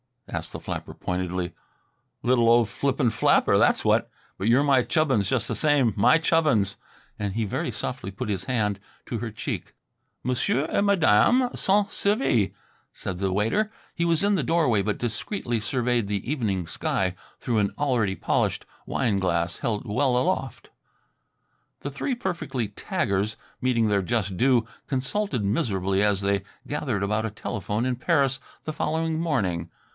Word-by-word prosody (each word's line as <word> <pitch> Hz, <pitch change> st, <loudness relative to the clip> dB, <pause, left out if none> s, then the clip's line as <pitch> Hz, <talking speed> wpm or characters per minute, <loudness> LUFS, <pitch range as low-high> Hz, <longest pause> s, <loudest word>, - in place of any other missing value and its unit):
asked -, -, -5 dB
the -, -, -5 dB
flapper -, -, -5 dB
pointedly. 90 Hz, 0 st, -3 dB, 0.7 s
"Little 120 Hz, -2 st, +4 dB
old 115 Hz, -2 st, +5 dB
flippant 135 Hz, +1 st, +1 dB
flapper, 110 Hz, -, +4 dB
that's -, -, +3 dB
what! -, -, +2 dB, 0.3 s
But 95 Hz, -, -2 dB
you're 125 Hz, +5 st, +5 dB
my 135 Hz, -3 st, +4 dB
Chubbins 130 Hz, -, +1 dB
just 125 Hz, -5 st, +1 dB
the -, -, -2 dB
same; 145 Hz, -7 st, +3 dB
my 125 Hz, +8 st, +6 dB
Chubbins!" 155 Hz, -, +2 dB, 0.4 s
and 100 Hz, -2 st, -2 dB
he 115 Hz, +2 st, 0 dB
very 100 Hz, -, -2 dB
softly 95 Hz, -, -4 dB
put 105 Hz, +4 st, -5 dB
his 95 Hz, -3 st, -2 dB
hand 105 Hz, -6 st, 0 dB, 0.3 s
to 115 Hz, -, -3 dB
her 115 Hz, +1 st, -3 dB
cheek. 110 Hz, -, -5 dB, 0.5 s
"Monsieur 130 Hz, +11 st, +1 dB
et -, -, +1 dB
Madame 200 Hz, -, +4 dB
sont 200 Hz, +1 st, +1 dB
servi," 200 Hz, -, +1 dB, 0.4 s
said 90 Hz, -2 st, -5 dB
the 95 Hz, -1 st, 0 dB
waiter. 115 Hz, -, +1 dB, 0.2 s
He 170 Hz, -, -1 dB
was 170 Hz, +1 st, +2 dB
in 205 Hz, +1 st, +3 dB
the 175 Hz, -, +1 dB
doorway 140 Hz, -8 st, +2 dB
but 105 Hz, +1 st, -1 dB
discreetly 120 Hz, -, -2 dB
surveyed 120 Hz, 0 st, 0 dB
the 100 Hz, 0 st, -3 dB
evening 105 Hz, -, -1 dB
sky 90 Hz, +2 st, -1 dB, 0.3 s
through 115 Hz, -3 st, 0 dB
an 100 Hz, -1 st, +1 dB
already 120 Hz, -9 st, +1 dB
polished -, -, 0 dB, 0.2 s
wine 110 Hz, -6 st, +1 dB
glass 85 Hz, -2 st, 0 dB
held 110 Hz, 0 st, -2 dB
well 125 Hz, +3 st, +1 dB
aloft. 135 Hz, -4 st, -1 dB, 1.1 s
The 140 Hz, -, -4 dB
three 245 Hz, -, -2 dB
perfectly 170 Hz, -, -3 dB
taggers 100 Hz, +2 st, -1 dB, 0.2 s
meeting 115 Hz, -4 st, +2 dB
their 100 Hz, -1 st, +2 dB
just 100 Hz, -1 st, -1 dB
due, 125 Hz, -1 st, +3 dB, 0.2 s
consulted 135 Hz, -, -1 dB
miserably 100 Hz, -2 st, 0 dB
as 105 Hz, -2 st, +2 dB
they 100 Hz, -1 st, +1 dB, 0.2 s
gathered 130 Hz, -9 st, -2 dB
about 105 Hz, +2 st, 0 dB
a -, -, -1 dB
telephone 105 Hz, +2 st, -3 dB
in 130 Hz, -1 st, -1 dB
Paris 135 Hz, +1 st, +2 dB, 0.2 s
the 155 Hz, -, -4 dB
following 160 Hz, +1 st, -1 dB
morning. 95 Hz, -, -1 dB
120 Hz, 155 wpm, -25 LUFS, 100-145 Hz, 1.1 s, my